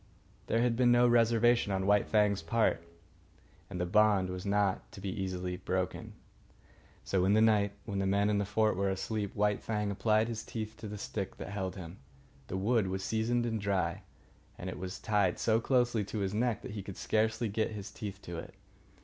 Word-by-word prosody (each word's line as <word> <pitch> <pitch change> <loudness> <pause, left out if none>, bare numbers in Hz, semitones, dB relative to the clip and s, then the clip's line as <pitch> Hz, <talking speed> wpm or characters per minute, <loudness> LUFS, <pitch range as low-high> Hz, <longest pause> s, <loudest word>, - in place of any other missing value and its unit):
There 115 +1 +2
had 120 -1 +2
been 120 0 +4
no 120 0 +5
reservation 120 -1 +4
on 95 0 0
White 105 0 +3
Fang's 105 -4 +2
part, 110 +3 +1 0.9
and 90 - -5
the 90 - 0
bond 100 -1 +3
was 90 +2 -5
not 100 -1 0
to - - -9
be 95 0 -4 0.5
broken 95 0 -1
easily. - - -11 0.9
So, 95 -2 +1
in 95 +2 +3
the - - +5
night, 105 -2 +3
when 100 -2 -3
the 95 - 0
men 100 +1 +2
in 105 -1 +2
the - - +1
fort 110 +1 +1
were 100 +1 0
asleep, 100 +2 -3
White 105 0 +1
Fang 105 -2 -1
applied 110 +2 +2
his 115 -1 -4
teeth 110 -1 -5
to 110 - -7
the 105 0 -6
stick 100 -1 -5
that - - -7
held 95 -2 -3
him. 90 -1 -9 0.5
The 95 - -3
wood 105 +1 +2
was 95 +1 -3
seasoned 115 +3 0
and 110 -2 -2
dry, 100 -2 0 0.6
and 90 +1 -5
it - - -8
was 95 0 -5
tied 100 -4 +1
so 110 -1 +2
closely 120 -3 +2
to 110 - -5
his 100 -1 -1
neck 115 +1 0
that - - -6
he 105 -1 -5
could 95 -1 -8
scarcely 110 +2 0
get 110 +2 -1
his 100 -3 -7
teeth 100 -1 -6
to 85 -1 -6
it. - - -10
105 Hz, 205 wpm, -31 LUFS, 95-110 Hz, 0.9 s, no